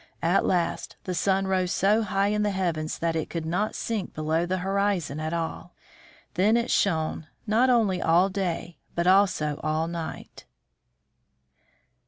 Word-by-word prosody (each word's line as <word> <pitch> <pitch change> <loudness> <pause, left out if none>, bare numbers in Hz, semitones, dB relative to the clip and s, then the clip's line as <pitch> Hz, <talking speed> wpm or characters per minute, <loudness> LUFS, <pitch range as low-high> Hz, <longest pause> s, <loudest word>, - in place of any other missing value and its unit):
At 175 +4 +2
last 175 -2 -1
the 185 - -3
sun 195 +3 +1
rose 185 -1 0
so 210 +4 +3
high 200 -1 +1
in 210 0 0
the 210 - +1
heavens 170 -5 -2
that 165 -1 -1
it 160 - -2
could 165 -2 -4
not 180 +7 -1
sink 220 -5 -3
below 160 +2 0
the 185 +1 0
horizon 195 -6 0
at 155 0 -3
all. 165 -1 -4 0.6
Then 210 +5 +3
it 235 +1 -1
shone, 160 -4 0 0.2
not 230 +4 +3
only 210 -7 +2
all 170 +3 +4
day, 180 -3 -3 0.2
but 170 - 0
also 185 -6 +3
all 155 +1 0
night. 170 -1 -7
180 Hz, 155 wpm, -26 LUFS, 165-200 Hz, 0.6 s, all